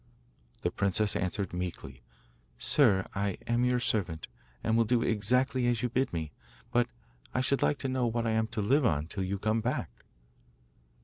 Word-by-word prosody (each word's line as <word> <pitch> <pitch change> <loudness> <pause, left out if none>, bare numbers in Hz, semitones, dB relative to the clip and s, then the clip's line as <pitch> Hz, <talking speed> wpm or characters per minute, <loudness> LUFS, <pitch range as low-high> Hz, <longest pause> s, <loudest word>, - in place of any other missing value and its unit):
The - - +1
princess 100 +1 +1
answered 95 0 -2
meekly: 85 -8 -5 0.6
'Sir, 100 - +4
I 100 -1 -1
am 120 +1 +1
your 125 0 +2
servant, 90 -9 0 0.4
and 110 - +1
will 115 - +5
do 115 +1 +2
exactly 125 +4 +2
as 120 -1 +1
you 125 - +1
bid 130 +3 0
me; 80 -3 -4 0.4
but 120 0 +3 0.5
I 125 - +2
should 135 +1 +1
like 145 - +2
to 135 - -1
know 130 -2 0
what 115 0 -1
I 115 - +1
am 110 0 +1
to 110 -2 -3
live 135 +8 +3
on 75 -9 +1
till 95 +4 -3
you 95 +2 -2
come 110 +3 0
back? 120 - -2
110 Hz, 180 wpm, -30 LUFS, 95-125 Hz, 0.6 s, will